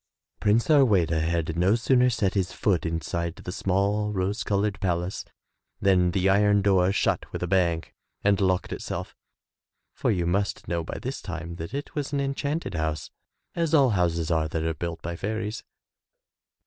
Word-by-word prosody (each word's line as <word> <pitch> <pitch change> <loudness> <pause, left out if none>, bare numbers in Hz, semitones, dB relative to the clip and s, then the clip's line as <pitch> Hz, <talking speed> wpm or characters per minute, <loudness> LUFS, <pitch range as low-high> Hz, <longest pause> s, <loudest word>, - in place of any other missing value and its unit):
Prince 105 +3 +3
Harweda 100 - +4
had 80 0 -1
no 90 +5 +3
sooner 125 +1 +3
set 110 -5 0
his 95 -3 0
foot 95 -4 +1
inside 85 +1 -3
the 90 - -7
small, 100 +3 0
rose 100 +2 -1
colored 100 0 0
palace 90 -1 -2 0.5
than 95 -2 +3
the 95 +2 +1
iron 100 +1 +4
door 95 -2 +4
shut 100 - 0
with - - -4
a - - -1
bang 85 -3 +2 0.4
and 100 0 +3
locked 95 -1 +1
itself. - - -5 0.8
For - - -1
you 90 -5 +1
must 100 +4 -1
know 85 -1 -1
by - - -6
this 130 +2 -5
time 85 -3 -6
that 85 +9 -6
it 145 - -5
was 145 -1 -3
an 140 - +1
enchanted 140 +1 -2
house, 80 -2 -2 0.4
as 165 -2 +1
all 135 -5 +5
houses 85 -3 0
are 80 -1 +2
that 80 +1 -3
are 80 0 0
built 85 +1 -5
by 85 +1 -4
fairies. 110 +3 -3
95 Hz, 170 wpm, -26 LUFS, 85-105 Hz, 0.8 s, all